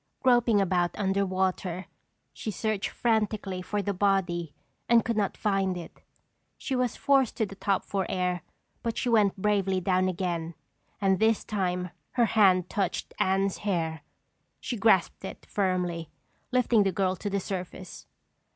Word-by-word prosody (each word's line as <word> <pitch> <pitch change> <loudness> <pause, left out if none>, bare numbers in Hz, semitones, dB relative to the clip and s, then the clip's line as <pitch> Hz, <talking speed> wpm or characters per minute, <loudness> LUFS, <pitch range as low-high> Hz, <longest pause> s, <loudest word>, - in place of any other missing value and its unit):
Groping 240 -4 +4
about 180 -2 +1
under 195 -1 +1
water, 185 -1 -1 0.5
she - - -5
searched 215 -1 -1
frantically 215 -5 0
for 205 +2 -2
the 200 - -1
body 180 -4 +1 0.4
and 235 -1 +5
could 230 - 0
not 205 -2 0
find 195 -3 0
it. 170 - -10 0.6
She 265 - -3
was 250 -2 0
forced 270 -4 +2
to 220 - +2
the 195 - -9
top 195 0 -1
for 195 -2 -2
air 180 -2 -1 0.4
but 230 -1 -3
she 250 - 0
went 210 -4 +3
bravely 195 -2 +1
down 185 0 +2
again 170 -3 -3 0.4
and 195 -2 +2
this 220 0 +3
time 180 -4 -2 0.2
her 240 -2 +4
hand 190 -5 +4
touched 195 -2 -2
Anne's 195 +1 +1
hair. 165 -6 -1 0.6
She 250 - -4
grasped 205 -6 +3
it 190 - -8
firmly, 180 -4 -1 0.4
lifting 245 -3 +3
the 195 -1 +2
girl 185 0 0
to 205 - -3
the 200 0 0
surface. 185 -1 -6
195 Hz, 150 wpm, -28 LUFS, 185-215 Hz, 0.6 s, and